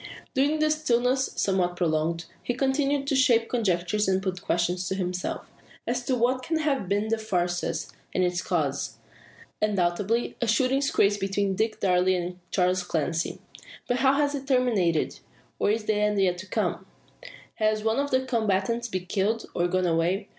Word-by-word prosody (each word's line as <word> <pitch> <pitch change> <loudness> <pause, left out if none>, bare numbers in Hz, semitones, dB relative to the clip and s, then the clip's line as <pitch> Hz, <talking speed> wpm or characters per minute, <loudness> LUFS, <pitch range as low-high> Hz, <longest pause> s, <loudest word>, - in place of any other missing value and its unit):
During 290 +3 +2
the 310 0 +2
stillness, 260 -3 +1
somewhat 185 -2 +1
prolonged, 165 0 0 0.2
he 245 - -2
continues 275 +1 +1
to 275 - +1
shape 235 -3 +4
conjectures 205 -3 +1
and 190 0 +2
put 185 -2 -3
questions 175 +1 0
to 190 - -1
himself, 180 -1 -3 0.4
as 245 +1 -1
to 260 - +1
what 250 +2 +1
can 320 +5 -1
have 280 - -1
been 205 +2 0
the 225 0 +1
fracas, 175 -5 -2 0.2
and 185 - +1
its 180 -1 0
cause. - - -1 0.6
Undoubtedly 205 +3 0
a 235 - +1
"shooting 260 +4 +2
scrape" 205 -7 +2
between 195 0 0
Dick 220 +3 -1
Darke 180 -1 +3
and 180 -1 0
Charles 185 0 +2
Clancy. 165 -1 -2 0.5
But 245 - +1
how 265 +1 +4
has 285 0 +1
it 275 -1 -5
terminated, 220 - +1 0.4
or - - +2
is 215 +1 +1
the 215 - +2
end 210 -1 +1
yet 180 -2 +1
come? - - -1 0.7
Has 215 -1 +1
one 225 +3 +1
of 285 0 0
the 260 -1 +1
combatants 230 -1 0
been 185 -4 -4
killed, 210 +4 0
or 175 0 +1
gone 185 +1 0
away? 175 +4 0
210 Hz, 170 wpm, -26 LUFS, 180-250 Hz, 0.7 s, shape